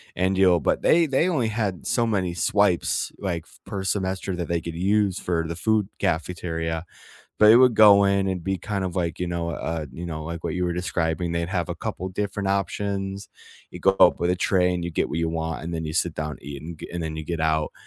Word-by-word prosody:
and 95 +1 +1
you'll 90 -3 +5
but 70 - 0
they 165 0 +4
they 150 +5 +2
only 130 -10 +1
had 105 -5 -2
so 120 -2 +1
many 95 -5 0
swipes 85 - +1
like 85 -4 -3 0.2
per 95 -2 -5
semester 95 -1 -1
that 85 -1 -4
they 85 0 0
could 85 0 -7
use 100 +2 +1
for 85 -2 -1
the 85 - -4
food 105 +2 +1
cafeteria. 80 -1 -2 0.5
But 105 0 +7
it 115 - +9
would 125 -2 +6
go 100 -2 +7
in 100 0 +2
and 90 -3 -3
be 95 -1 -1
kind 100 0 -3
of 90 -2 -3
like, 85 -3 -2
you 90 - -2
know, 85 -1 -2
uh, 80 -1 -3
you 85 +5 -6
know, 80 -2 -5
like 85 0 -6
what 80 - -2
you 90 0 -1
were 90 - 0
describing. 85 -1 -1
They'd 85 0 -1
have 90 -4 -2
a - - -3
couple 95 - -4
different 100 +1 -3
options. 100 0 -2 0.4
You - - -8
go 95 - +5
up 90 - +6
with 85 - +1
a 90 - +1
tray, 90 0 +2
and 90 -1 -2
you 85 - -4
get - - 0
what 80 - -3
you 85 0 0
want, 80 0 -3
and 85 +1 -4
then 80 0 -3
you 80 - -4
sit 85 -1 0
down 75 -1 -3
and - - -12
eat, 70 -1 -7
and 80 0 -8
g - - -8
and 85 -1 -3
then 80 -1 -4
you 80 - -5
get 85 +1 -3
out. 80 -1 +1
90 Hz, 245 wpm, -24 LUFS, 80-100 Hz, 0.5 s, it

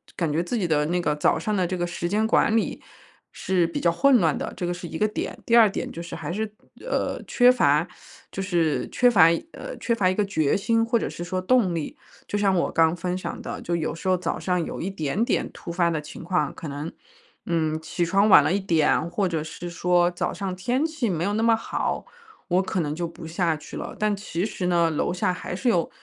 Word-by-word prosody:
感 165 -4 -1
觉 165 +3 0
自 240 +7 -2
己 185 -6 0
的 150 -2 +2
那 175 +1 0
个 150 -3 0
早 150 +2 +2
上 210 +5 -1
的 185 -2 +1
这 185 0 -3
个 175 - -1
时 175 0 -3
间 215 +2 +1
管 225 - +3
理， 225 - -1 0.5
是 180 -3 0
比 170 - -4
较 170 - +3
混 255 +9 +4
乱 160 -6 +2
的， - - -4
这 175 - -3
个 175 - -1
是 175 -1 -7
一 160 - -6
个 215 - +2
点。 215 - -4
第 230 - +3
2 225 -3 +7
点 - - -4
就 170 - -7
是 170 - -7
还 - - -5
是， 215 +4 -1 0.4
呃， - - -1
缺 245 0 +5
乏 150 - +3 0.5
就 195 - -4
是 165 -8 0
缺 245 0 +4
乏 190 -9 +6 0.3
呃， - - -7
缺 235 - 0
乏 185 -5 +2
一 185 - 0
个 210 - +1
决 155 -7 +1
心， 225 +3 +1
或 235 +1 +2
者 - - -3
是 175 - -6
说 185 +1 -3
动 200 -2 +3
力。 160 - -4 0.3
就 205 - -2
像 195 -2 +3
我 170 - +1
刚 165 0 +3
分 180 +1 -3
享 - - -6
的， - - -6
就 170 - -2
有 160 -2 -2
时 165 - -7
候 185 - +4
早 175 -1 -3
上 180 -2 0
有 - - -6
一 190 - -2
点 175 +3 -1
点 - - 0
突 170 - -8
发 170 -1 +2
的 160 -2 -1
情 150 - -10
况， 180 +2 0
可 160 - -7
能， 145 +4 -5 0.5
嗯， 160 -2 0
起 170 +2 -2
床 195 +4 +3
晚 - - +9
了 - - +1
一 200 - +1
点， 165 -2 +2
或 190 +2 0
者 160 -3 -2
是 175 +2 -7
说 175 0 +2
早 175 - -2
上 190 -2 -4
天 245 +10 0
气 300 -9 -2
没 170 -2 -1
有 205 - 0
那 220 +1 0
么 230 -1 +5
好， 225 - -3 0.4
我 180 +1 +2
可 185 0 -2
能 150 -3 -1
就 170 +1 -2
不 165 0 -10
下 165 -1 0
去 150 - -11
了。 - - -6
但 210 -1 +1
其 185 -2 -3
实 185 -4 -3
呢， 170 -2 +3
楼 160 +2 -1
下 180 0 0
还 180 - -6
是 245 +6 0
有 175 -7 +1
180 Hz, 265 characters per minute, -24 LUFS, 165-205 Hz, 0.5 s, 晚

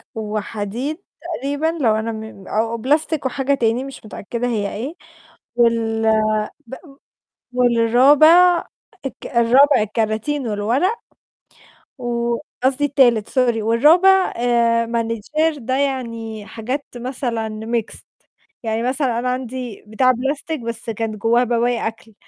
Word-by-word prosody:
وحديد 215 +5 -4 0.2
تقريبًا 290 -2 -2
لو 220 -3 +3
أنا 220 +1 -2
م 220 -3 -9
أو 225 +2 -1
بلاستيك 295 +4 0
وحاجة 270 +1 0
تاني 235 -1 +1
مش 270 -4 -10
متأكدة 235 +3 -4
هي 210 -4 -2
إيه 255 +9 -4 0.6
وال 230 -2 +2 0.7
بأ 265 - -8 0.8
والرابع 270 +9 +5 0.4
الك 270 - -6
الرابع 250 +2 +4
الكراتين 220 +6 -1
والورق 240 - 0 1.0
و 235 -1 -1 0.3
قصدي 270 +2 +2
التالت 245 -6 +3
سوري، 240 -4 +1
والرابع 335 - +4
آآ 235 -1 +2
manager 235 +7 -1
ده 260 +1 -2
يعني 230 -6 -3
حاجات 250 +7 -4
مثلًا 235 -3 -4
mixed. 230 -1 -3 0.6
يعني 225 +1 -1
مثلًا 255 -2 0
أنا 250 - -1
عندي 250 -3 -5
بتاع 255 +4 +3
بلاستيك، 280 +5 -3
بس 230 0 -5
كانت 225 0 -3
جوّاه 235 +3 +3
بواقي 240 -1 0
أكل، 225 0 -9
240 Hz, 115 wpm, -20 LUFS, 225-270 Hz, 1.0 s, والرابع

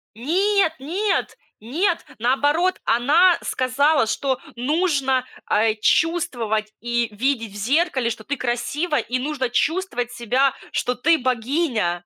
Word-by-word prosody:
Нет 370 - +1
нет 370 +10 -1 0.2
нет, 330 - -1
наоборот, 290 +9 +1
она 330 +9 +4
сказала, 275 0 +1
что 265 +2 -1 0.2
нужно, 270 -2 +1 0.2
а, 215 +1 +2
чувствовать 225 -7 0
и 240 0 -1
видеть 230 -1 -1
в 205 - -10
зеркале, 265 - +1
что 225 -1 -6
ты 285 +3 -3
красива 285 +7 -2
и 255 +1 -2
нужно 265 -2 -2
чувствовать 245 -4 -1
себя, 255 +3 +1 0.2
что 250 0 -1
ты 320 +6 +3
богиня. 240 - -1
260 Hz, 120 wpm, -22 LUFS, 235-320 Hz, 0.2 s, она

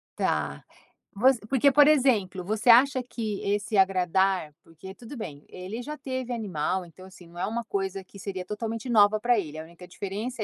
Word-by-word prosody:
Tá. - - -1 0.5
Vo 225 +6 +2 0.2
porque 275 +1 +4
por 290 +1 +6
exemplo, 220 -11 +2
você 215 +5 -1
acha 255 +2 +6
que 220 -4 -5
esse 205 +1 -1
agradar, 190 -3 +2
porque 165 +4 -12
tudo 240 +3 -10
bem, 150 -9 -7
ele 190 +6 -7
já 300 +4 -7
teve 260 -2 -5
animal, 185 -4 -2
então 185 +3 -15
assim, 185 -2 -15
não 175 +1 -12
é - - 0
uma 235 +2 -3
coisa 195 -2 -3
que 200 - -16
seria 185 -2 -5
totalmente 225 +4 -5
nova 215 -1 +5
para 240 +1 +2
ele, 155 -4 -6
a 160 - -6
única 170 +2 -14
diferença 210 +5 -5
205 Hz, 185 wpm, -26 LUFS, 185-235 Hz, 0.5 s, por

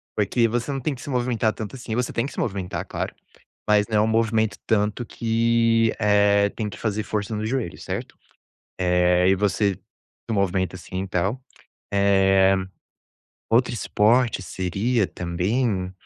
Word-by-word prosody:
porque 110 +3 +2
você 120 +4 -2
não 135 - -2
tem 140 +3 -2
que 125 - -10
se 145 - -8
movimentar 120 -4 0
tanto, 110 +3 -7
assim. 120 -3 -5
Você 125 0 -1
tem 115 - -1
que 140 - -7
se - - -6
movimentar, 95 -4 -3
claro, - - -4 0.5
mas 105 0 +4
não 110 - 0
é - - +4
um 110 - +2
movimento 110 -2 +1
tanto 105 +2 0
que, 115 0 +2
eh, 100 -1 +4
tem 110 -2 -4
que 105 - -10
fazer 110 -1 -1
força 105 +1 -3
no 105 +1 -3
joelho, 115 -6 -2
certo? - - -6 0.6
Eh, 90 0 +3
e - - +5
você 100 0 +1
se 115 - -13
movimenta 95 -2 0
assim 95 +1 -5
e - - -8
tal, 95 +8 -1 0.5
eh. 95 -1 +4 1.0
Outro 125 +2 +3
esporte 115 -1 +2
seria 95 +5 -1
também, 95 +3 -1
105 Hz, 160 wpm, -23 LUFS, 95-115 Hz, 1.0 s, e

